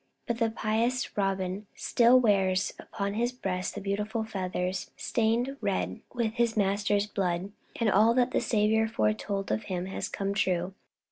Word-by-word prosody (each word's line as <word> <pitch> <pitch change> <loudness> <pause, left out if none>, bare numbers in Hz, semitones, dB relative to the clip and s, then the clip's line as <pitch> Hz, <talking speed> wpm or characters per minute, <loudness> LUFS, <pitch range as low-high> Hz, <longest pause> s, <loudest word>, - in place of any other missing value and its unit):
But 235 -1 -2
the 230 -1 +2
pious 230 +3 -1
Robin 195 0 -1
still 245 +2 +5
wears 195 -5 +2
upon 200 -1 -4
his 240 +3 0
breast 185 -7 -3
the 205 - -5
beautiful 210 +3 -2
feathers 185 -3 -3
stained 240 +4 0
red 90 0 -1
with 235 -3 -1
his 235 -1 +1
Master's 200 0 +2
blood. 190 -2 -2 0.3
And 230 - +2
all 215 +3 +5
that 250 0 +3
the - - +1
Saviour 220 0 +2
foretold 195 - -1
of 215 - -1
him 180 -2 -3
has 190 - -4
come 200 0 -2
true. 185 -2 0
205 Hz, 155 wpm, -29 LUFS, 190-225 Hz, 0.3 s, still